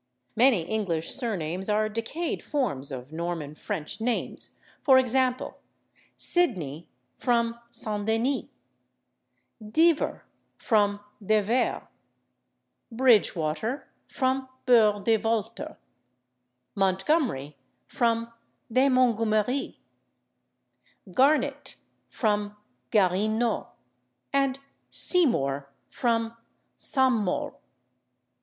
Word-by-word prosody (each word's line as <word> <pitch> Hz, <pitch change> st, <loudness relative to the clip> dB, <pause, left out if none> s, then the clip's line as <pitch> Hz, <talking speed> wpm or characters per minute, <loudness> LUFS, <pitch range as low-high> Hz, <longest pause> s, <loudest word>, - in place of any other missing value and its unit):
Many 235 Hz, -7 st, +4 dB
English 170 Hz, -5 st, -2 dB
surnames 190 Hz, -, -2 dB
are 215 Hz, +1 st, +2 dB
decayed 230 Hz, +10 st, -3 dB
forms 145 Hz, -, -1 dB
of 130 Hz, +1 st, -7 dB
Norman 165 Hz, -2 st, -4 dB
French 200 Hz, +3 st, -5 dB
names, 240 Hz, +1 st, -1 dB, 0.2 s
for 265 Hz, -2 st, +6 dB
example, 255 Hz, 0 st, +1 dB, 0.6 s
/Sidney/ 175 Hz, -, +2 dB, 0.3 s
from 235 Hz, -1 st, 0 dB
/St. 215 Hz, -3 st, -2 dB
Denis/, 235 Hz, +3 st, +1 dB, 1.2 s
/Divver/ 315 Hz, +9 st, +2 dB, 0.4 s
from 205 Hz, -3 st, +1 dB, 0.2 s
/De 215 Hz, +1 st, +2 dB
Vere/, 240 Hz, +5 st, 0 dB, 1.0 s
/Bridgewater/ 220 Hz, -, +2 dB, 0.2 s
from 260 Hz, 0 st, -1 dB, 0.2 s
/Burgh 215 Hz, -5 st, +4 dB
de 225 Hz, +1 st, +3 dB
Walter/, 225 Hz, +7 st, -3 dB, 1.0 s
/Montgomery/ 190 Hz, -, 0 dB, 0.3 s
from 230 Hz, -1 st, -1 dB, 0.4 s
/de 260 Hz, +3 st, +4 dB
Mungumeri/, 230 Hz, 0 st, +1 dB, 1.3 s
/Garnett/ 280 Hz, +5 st, +1 dB, 0.3 s
from 210 Hz, -2 st, -1 dB, 0.3 s
/Guarinot/, 215 Hz, +4 st, +1 dB, 0.7 s
and 275 Hz, -1 st, +2 dB, 0.3 s
/Seymour/ 140 Hz, -, +2 dB, 0.2 s
from 230 Hz, -1 st, 0 dB, 0.4 s
/Saint 260 Hz, -5 st, +2 dB
Maure 180 Hz, -, -2 dB
225 Hz, 80 wpm, -27 LUFS, 195-255 Hz, 1.3 s, for